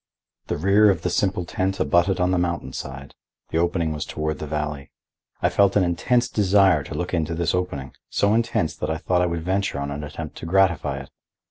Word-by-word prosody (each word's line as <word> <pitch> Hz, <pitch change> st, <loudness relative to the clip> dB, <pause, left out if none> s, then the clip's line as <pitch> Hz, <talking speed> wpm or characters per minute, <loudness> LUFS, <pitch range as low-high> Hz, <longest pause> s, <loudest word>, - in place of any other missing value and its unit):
The -, -, -2 dB
rear 100 Hz, +6 st, +5 dB
of 90 Hz, -4 st, 0 dB
the 90 Hz, -, 0 dB
simple 95 Hz, -1 st, 0 dB
tent 95 Hz, +2 st, -2 dB
abutted 90 Hz, +2 st, +2 dB
on 90 Hz, 0 st, +2 dB
the 90 Hz, -, +2 dB
mountain 85 Hz, -1 st, -2 dB
side; 70 Hz, 0 st, -7 dB, 0.4 s
the 80 Hz, -, +1 dB
opening 85 Hz, -1 st, 0 dB
was 75 Hz, -, -3 dB
toward 75 Hz, 0 st, -3 dB
the 75 Hz, -, -5 dB
valley. 75 Hz, -2 st, -3 dB, 0.5 s
I -, -, +4 dB
felt 100 Hz, -1 st, +3 dB
an 100 Hz, -, +4 dB
intense 120 Hz, +8 st, +1 dB
desire 95 Hz, -6 st, +4 dB
to -, -, -7 dB
look 90 Hz, +1 st, -3 dB
into 80 Hz, -1 st, 0 dB
this 85 Hz, 0 st, 0 dB
opening,—so 90 Hz, -, -1 dB
intense 115 Hz, -8 st, 0 dB
that -, -, -3 dB
I 80 Hz, -, -1 dB
thought 90 Hz, +2 st, +1 dB
I 90 Hz, -, +2 dB
would 85 Hz, -1 st, -3 dB
venture 95 Hz, -4 st, -1 dB
on 70 Hz, 0 st, -3 dB
an 75 Hz, +1 st, -5 dB
attempt 75 Hz, +1 st, -7 dB
to -, -, -7 dB
gratify 95 Hz, -3 st, +2 dB
it. -, -, -13 dB
85 Hz, 210 wpm, -23 LUFS, 80-95 Hz, 0.5 s, rear